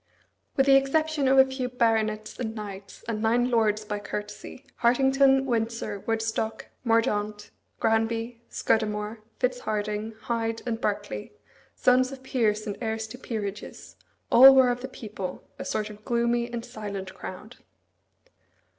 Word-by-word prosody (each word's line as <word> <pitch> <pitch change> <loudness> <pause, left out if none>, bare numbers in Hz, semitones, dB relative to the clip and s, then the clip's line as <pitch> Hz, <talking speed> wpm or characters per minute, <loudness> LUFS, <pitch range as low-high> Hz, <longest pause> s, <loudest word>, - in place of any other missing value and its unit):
With 270 - +4
the 270 -1 +7
exception 295 +1 +1
of 265 +1 +4
a 265 - +9
few 265 -1 -3
baronets 220 -3 0
and 220 -3 -3
knights, 200 -2 -8
and 220 -2 -2
nine 240 +3 +2
lords 215 -2 +2
by 210 -1 -3
courtesy 210 +6 -7 0.2
Hartington, 270 +2 +4
Windsor, 225 -4 -2
Woodstock, 225 0 -2
Mordaunt, 210 -3 0 0.3
Granby, 225 +1 0
Scudamore, 210 0 0 0.2
Fitzharding, 215 -4 -2
Hyde, 230 -2 -2
and 230 -2 -2
Berkeley 205 - -3 0.4
sons 255 +1 +3
of 265 -1 -9
peers 220 -5 0
and 205 -2 -5
heirs 220 -1 -2
to 250 - -9
peerages 210 -4 -6 0.4
all 265 +3 +10
were 260 -2 +6
of 245 0 -3
the 260 - -4
people, 210 -7 -7 0.2
a - - -3
sort 215 0 -2
of 210 0 -14
gloomy 235 0 0
and 235 0 -4
silent 200 -5 -6
crowd. 215 +5 -9
225 Hz, 135 wpm, -27 LUFS, 210-250 Hz, 0.4 s, all